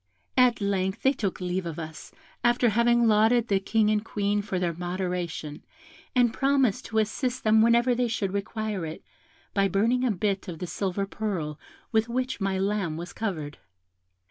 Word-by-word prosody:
At 250 -3 +4
length 190 -1 -1
they 265 - +4
took 205 -8 -3
leave 180 0 -2
of 165 - -5
us, 160 -1 -8 0.3
after 240 0 +4
having 235 +1 +3
lauded 225 +2 +4
the 195 -1 +3
King 215 +2 +2
and 210 0 +1
Queen 205 -2 0
for 200 -2 -3
their 175 -2 0
moderation, 175 -3 -4 0.5
and 240 -2 +4
promised 270 -6 +2
to 220 - -3
assist 245 +4 0
them 220 0 +5
whenever 235 +2 +4
they 245 0 +1
should 205 -4 -2
require 205 -1 -3
it, 160 0 -6 0.5
by 195 -1 +3
burning 230 +7 +1
a 255 - +2
bit 200 0 -1
of 170 -3 -6
the 180 - -4
silver 195 +3 -2
purl 185 -8 -4 0.3
with 225 +1 +2
which 255 0 -2
my 195 -1 0
lamb 195 -4 -1
was 175 +1 -7
covered. 160 -10 -4
205 Hz, 170 wpm, -27 LUFS, 185-235 Hz, 0.5 s, them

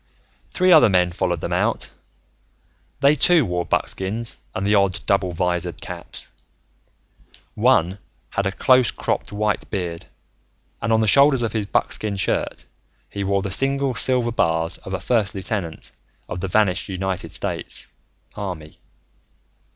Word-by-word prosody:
Three 185 0 +2
other 155 -9 +8
men 90 -2 +3
followed 90 -1 -1
them - - -3
out. - - 0 1.1
They, 140 +1 +6
too, 155 0 +4
wore 90 -2 -2
buckskins 110 +5 0 0.2
and 95 - -2
the 105 - +2
odd 100 -3 +1
double 100 -2 +1
visored 90 0 -2
caps. - - -7 1.2
One 100 -5 +2 0.3
had 100 - -1
a - - -1
close 130 +4 +4
cropped - - -2
white 105 0 -1
beard, 85 -5 -4 0.7
and 115 - -1
on 110 0 +4
the 110 - +1
shoulders 140 +2 +5
of 115 - -2
his 105 -3 -2
buckskin 105 0 -1
shirt, 95 - -2 0.5
he 100 - -3
wore 100 0 0
the 100 - -3
single 135 +4 +1
silver 125 +1 +2
bars 80 -5 +1
of - - -5
a - - -4
first 110 -6 0
lieutenant 95 -4 -4 0.4
of 90 - -5
the 95 - -2
vanished 95 -1 +1
United 95 -1 -3
States - - -4 0.5
Army. 90 -7 -7
100 Hz, 145 wpm, -22 LUFS, 90-115 Hz, 1.2 s, other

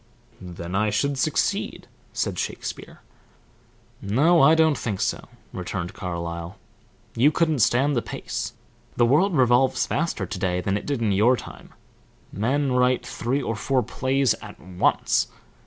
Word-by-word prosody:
"Then 85 -1 -7
I 105 +2 +2
should 135 +6 0
succeed," - - -1 0.3
said - - -2
Shakespeare. - - -6 1.0
"No, 150 - +3
I 155 +4 +7
don't 160 -2 +4
think 105 -7 -3
so," - - -1 0.3
returned 90 -1 -4
Carlyle. 85 -1 -5 0.6
"You 135 +6 +4
couldn't 160 -3 +1
stand 135 +6 +3
the 120 - +1
pace. - - -5 0.4
The 120 - +5
world 160 +10 +3
revolves 130 +1 +3
faster 165 +3 -1
to 105 - -6
day 90 -1 0
than 95 +2 -1
it 100 - -4
did 140 -5 -1
in 105 - +2
your 110 +6 +4
time - - -11 0.6
men 135 +6 0
write 125 0 +2
three 130 +4 -2
or 115 - -2
four 125 +5 0
plays 135 0 +1
at - - -11
once. 90 0 +1
120 Hz, 145 wpm, -24 LUFS, 95-140 Hz, 1.0 s, I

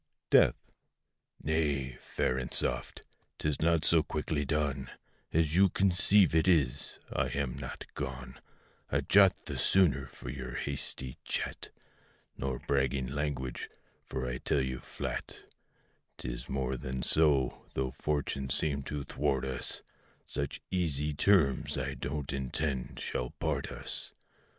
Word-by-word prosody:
DEATH. - - +7 0.9
Nay, 70 -5 0
fair 65 - 0
and 65 -1 -3
soft! 60 0 -1 0.3
'tis 75 -2 -1
not 85 0 +3
so 85 -2 +6
quickly 75 -1 -1
done 70 -2 -1 0.4
As 80 -1 +2
you 95 +1 +6
conceive 95 0 +4
it 80 +2 +4
is: 75 -9 +2 0.2
I - - +1
am 70 -3 -2
not - - -6
gone 65 -1 -5 0.5
A - - +1
jot 100 -1 +5
the - - -4
sooner 75 -9 +3
for 60 - -7
your 65 -3 -6
hasty 70 -2 -4
chat, - - -2 0.7
Nor 65 -1 -2
bragging 65 -1 0
language; 70 -3 -3 0.3
for 65 -1 -3
I 60 0 -3
tell 70 - +1
you 65 -1 -2
flat - - -5 0.8
'Tis - - -5
more 65 -1 -1
than 65 +1 -4
so, 75 -5 +3
though 65 -1 0
fortune 70 -1 -1
seem 70 +1 0
to 70 +1 -4
thwart 70 -1 0
us, 65 -2 -4 0.4
Such - - -4
easy 75 -5 0
terms 75 -5 +3
I - - -1
don't 70 0 -3
intend 65 0 -2
shall 60 - -2
part - - -1
us. - - -7
70 Hz, 130 wpm, -32 LUFS, 65-75 Hz, 0.9 s, DEATH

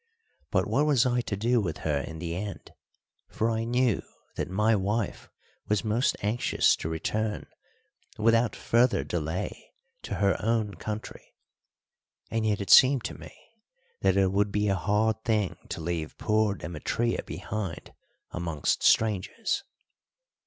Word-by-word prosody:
But - - +1
what 150 - +1
was 135 -5 +4
I 125 -1 +2
to 100 -4 -4
do 120 +3 +2
with 80 -6 -3
her 75 -2 +1
in 80 +3 -6
the 85 +1 -4
end? 100 +2 -6 0.6
for 115 +1 0
I 115 0 -1
knew 120 -2 +1 0.3
that - - -3
my 105 +4 +2
wife 105 +2 -2 0.4
was 105 -2 +1
most 110 +5 +1
anxious 110 +4 +2
to 80 - -4
return 105 +7 -2 0.7
without 115 +1 +3
further 120 +2 +2
delay 80 +1 -4 0.3
to - - -5
her 100 -1 +1
own 110 -2 +1
country; 105 +1 -7 1.0
and 110 0 0
yet 105 -1 0
it 100 - -2
seemed 130 -2 +7
to - - -5
me - - -12 0.6
that - - +3
it 95 -1 +3
would 100 +1 +1
be 105 0 +1
a 95 - +2
hard 105 +4 +1
thing 110 -5 0
to - - -4
leave 80 -1 -3
poor 110 -2 +1
Demetria 100 +8 -2
behind 95 -6 -6 0.4
amongst 85 -4 -1
strangers. 110 - +2
105 Hz, 145 wpm, -28 LUFS, 95-115 Hz, 1.0 s, seemed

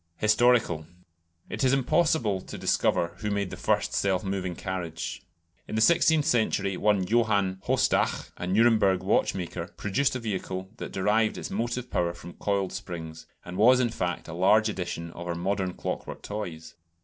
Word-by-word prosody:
Historical. 110 -7 +3 0.6
It - - -3
is 130 0 +4
impossible 135 - +2
to - - -9
discover 85 - +1
who 105 - -3
made 100 -2 -1
the - - -5
first - - 0
self 95 0 +1
moving 95 -2 -3
carriage. 90 -3 -5 0.5
In - - -5
the - - +1
sixteenth 160 +3 +4
century 110 -4 +1
one 100 -1 +2
Johann 100 -4 +1
Haustach, - - +1
a 90 - -5
Nuremberg 100 -2 +3
watchmaker, 90 -3 0
produced 130 +7 0
a - - -2
vehicle 95 -4 -4
that - - -6
derived 105 +3 +1
its - - -6
motive 120 +2 -3
power 85 -1 0
from 85 +1 -10
coiled 100 -2 -1
springs, 80 -2 -7 0.2
and 90 +1 -7
was 125 +5 +6
in 125 -2 +2
fact 90 -6 -3
a 80 - -7
large 105 +5 +4
edition 85 -4 -4
of 85 +1 -8
our 85 - -2
modern 95 +1 -1
clockwork - - -5
toys. 90 -7 -6
100 Hz, 160 wpm, -27 LUFS, 90-115 Hz, 0.6 s, was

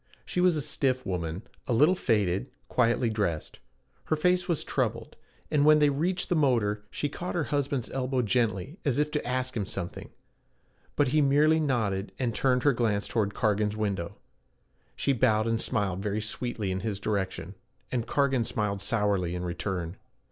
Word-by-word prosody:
She 180 - -1
was 180 -2 +4
a 150 - -2
stiff 130 -1 0
woman, 90 0 -3 0.2
a 125 - +1
little 150 +10 +5
faded, 105 - +1 0.2
quietly 120 0 +2
dressed. 100 -8 -2 0.5
Her 155 - +1
face 180 +3 +2
was 170 -4 0
troubled, - - -2 0.4
and 150 -2 +3
when 155 +1 +7
they 150 -1 +4
reached 175 +6 -1
the 175 - +1
motor, 115 -8 +2
she 145 - -2
caught 175 +6 -5
her 170 - +1
husband's 140 -3 0
elbow 130 -1 0
gently 115 - 0
as 140 -4 +1
if 150 +1 +1
to 150 - -1
ask 130 +1 -2
him 100 -4 -2
something, 90 -2 -6 0.9
but 145 -3 +3
he 155 +3 +3
merely 150 +3 +4
nodded 110 -10 0
and 120 -3 -1
turned 125 0 +2
her 145 - +5
glance 110 -4 0
toward 105 -3 -1
Cargan's 105 -1 +1
window. 100 -5 -2 0.8
She 140 - +1
bowed 110 -4 +3
and 115 0 0
smiled 95 -3 -1
very 105 +1 -1
sweetly 110 -2 -3
in 95 - -1
his 100 0 -3
direction, 95 -4 -2 0.4
and 120 -2 -1
Cargan 135 -3 +2
smiled 105 -3 -2
sourly 100 -5 0
in 90 - -3
return. 90 0 -3
115 Hz, 170 wpm, -28 LUFS, 100-140 Hz, 0.9 s, when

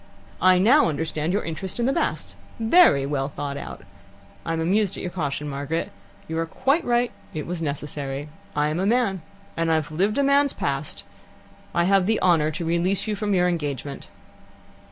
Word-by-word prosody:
"I 185 0 +6
now 235 - +5
understand 155 +1 -2
your 205 - 0
interest 180 +6 -5
in 235 - +1
the 270 - +2
Basts. - - -2 0.2
Very 225 - +5
well 140 -1 -1
thought 140 -1 -5
out. - - -8 0.6
I 165 - -2
am 165 - -1
amused 195 +4 +1
at - - -6
your 180 - -3
caution, 150 -4 -3
Margaret. 145 +3 -3 0.4
You 160 0 -2
are 165 - -1
quite 275 - +1
right 240 0 +1 0.2
it 155 - -3
was 175 -1 -4
necessary. 145 -1 -4 0.3
I 150 0 +2
am 155 +3 -2
a 190 - +1
man, 220 -6 +1 0.3
and 165 0 0
have 160 -1 +1
lived 195 - 0
a 280 - +3
man's 280 0 +4
past. 140 +1 -2 0.7
I 170 - +3
have 195 0 +3
the 220 0 +2
honour 165 -4 +3
to 155 +2 -4
release 170 +4 +1
you 215 -1 -1
from 205 -1 -1
your 180 -1 +3
engagement." 145 -5 -3
170 Hz, 185 wpm, -24 LUFS, 150-205 Hz, 0.7 s, I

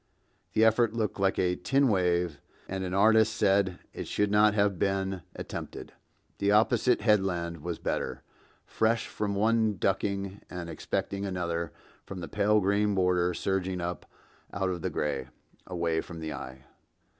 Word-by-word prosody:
(The 110 - +4
effort 115 0 +3
looked 110 -3 -1
like 95 0 +2
a 90 -1 +2
tin 135 +10 +2
wave, 90 - +1 0.3
and 95 0 -3
an 90 0 -3
artist 110 +2 +5
said 95 -2 +2 0.2
it - - -6
should 105 -1 0
not 105 0 +5
have 100 -3 +2
been 95 -1 0
attempted. - - -7 0.5
The 100 - +1
opposite 110 +3 +3
headland 90 -6 +1
was 85 +2 -4
better, - - -3 0.4
fresh 115 +1 +1
from 100 -1 -3
one 110 0 +2
ducking 100 +1 -1
and 85 -2 -6
expecting 100 +3 -3
another 85 -4 -2 0.3
from 95 - -7
the 85 - -5
pale 105 +1 +2
green 100 +1 +2
border 90 -1 +2
surging 95 -1 -1
up 85 0 -4 0.4
out 95 0 -1
of 90 -2 -4
the - - -1
gray, 70 -3 -2 0.4
away 85 -3 0
from 85 -2 -9
the 80 -1 -4
eye.) 65 +1 -8
95 Hz, 155 wpm, -29 LUFS, 90-105 Hz, 0.5 s, artist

